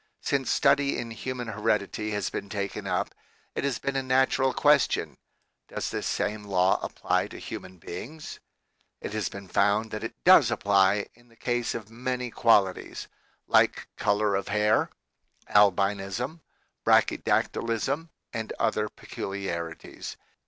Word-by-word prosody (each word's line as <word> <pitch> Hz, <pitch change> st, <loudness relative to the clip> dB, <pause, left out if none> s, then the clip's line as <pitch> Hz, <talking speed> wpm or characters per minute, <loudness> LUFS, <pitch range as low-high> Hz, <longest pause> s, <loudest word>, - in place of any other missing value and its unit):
Since 135 Hz, -2 st, 0 dB
study 140 Hz, 0 st, +3 dB
in 115 Hz, -1 st, -4 dB
human 125 Hz, +1 st, -5 dB
heredity 105 Hz, 0 st, -1 dB
has 105 Hz, -1 st, -2 dB
been 100 Hz, -, -5 dB
taken 100 Hz, -1 st, -4 dB
up, -, -, -1 dB, 0.4 s
it -, -, -3 dB
has 140 Hz, -3 st, 0 dB
been 140 Hz, -, -3 dB
a 135 Hz, -, +1 dB
natural 130 Hz, 0 st, +2 dB
question, 145 Hz, -1 st, +3 dB, 0.5 s
Does -, -, -4 dB
this -, -, -2 dB
same 105 Hz, 0 st, -1 dB
law 95 Hz, -2 st, +2 dB
apply -, -, 0 dB
to -, -, -10 dB
human 95 Hz, 0 st, -8 dB
beings? 125 Hz, -, -8 dB, 0.6 s
It -, -, -6 dB
has 110 Hz, -2 st, -1 dB
been 100 Hz, -1 st, -9 dB
found 105 Hz, +4 st, +2 dB
that 110 Hz, -, -4 dB
it -, -, -5 dB
does -, -, +7 dB
apply 100 Hz, 0 st, +3 dB
in 120 Hz, +1 st, -23 dB
the 115 Hz, -, -22 dB
case 120 Hz, 0 st, -1 dB
of 110 Hz, -1 st, -7 dB
many 125 Hz, +1 st, -3 dB
qualities, 100 Hz, -6 st, +2 dB, 0.4 s
like -, -, +3 dB
color 105 Hz, 0 st, +1 dB
of 100 Hz, -, -1 dB
hair, 105 Hz, +1 st, +2 dB, 0.6 s
albinism, 100 Hz, -, +2 dB, 0.4 s
brachydactylism, 135 Hz, +8 st, +1 dB, 0.2 s
and 115 Hz, -2 st, -4 dB
other -, -, +1 dB
peculiarities. 85 Hz, -4 st, -6 dB
110 Hz, 135 wpm, -27 LUFS, 100-125 Hz, 0.6 s, does